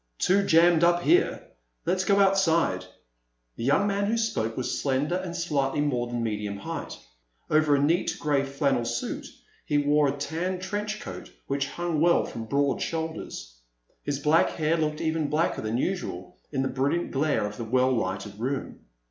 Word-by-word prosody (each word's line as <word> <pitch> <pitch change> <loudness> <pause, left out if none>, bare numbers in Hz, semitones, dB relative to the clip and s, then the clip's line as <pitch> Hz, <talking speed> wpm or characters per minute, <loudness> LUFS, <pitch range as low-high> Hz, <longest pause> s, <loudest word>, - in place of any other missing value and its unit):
"Too 200 - +3
jammed 170 -1 +5
up 175 0 +4
here. 360 +3 +3 0.4
Let's 185 +2 +1
go 200 0 +3
outside." 170 - +3 0.7
The - - -6
young 140 +10 +3
man 200 0 0
who 225 +2 +1
spoke 115 - -1
was 130 - -2
slender 140 +3 0
and 185 -2 -5
slightly 150 -5 0
more 125 -5 0
than 120 -1 -3
medium 105 -2 -3
height. 100 - -6 0.5
Over 155 -1 +4
a - - +2
neat 165 +6 +1
gray 145 -2 +1
flannel 135 -2 0
suit 120 0 -3 0.4
he 145 - 0
wore 145 0 +3
a 140 +1 -2
tan 165 +6 -2
trench 205 +3 -3
coat - - -8 0.2
which 140 0 -1
hung 170 -2 -2
well 170 +1 +4
from 115 - -6
broad 140 +3 0
shoulders. 160 - -4 0.5
His 145 -1 -2
black 150 +3 +3
hair 160 0 0
looked 150 -2 -1
even 160 -2 0
blacker 155 +4 0
than 110 +2 -2
usual 125 - -3 0.2
in 135 -2 0
the - - 0
brilliant 140 +6 -1
glare 145 -5 +1
of 105 0 -6
the 115 - -4
well 130 +3 +2
lighted 100 -2 -2
room. 130 +3 -3
145 Hz, 175 wpm, -26 LUFS, 130-170 Hz, 0.7 s, jammed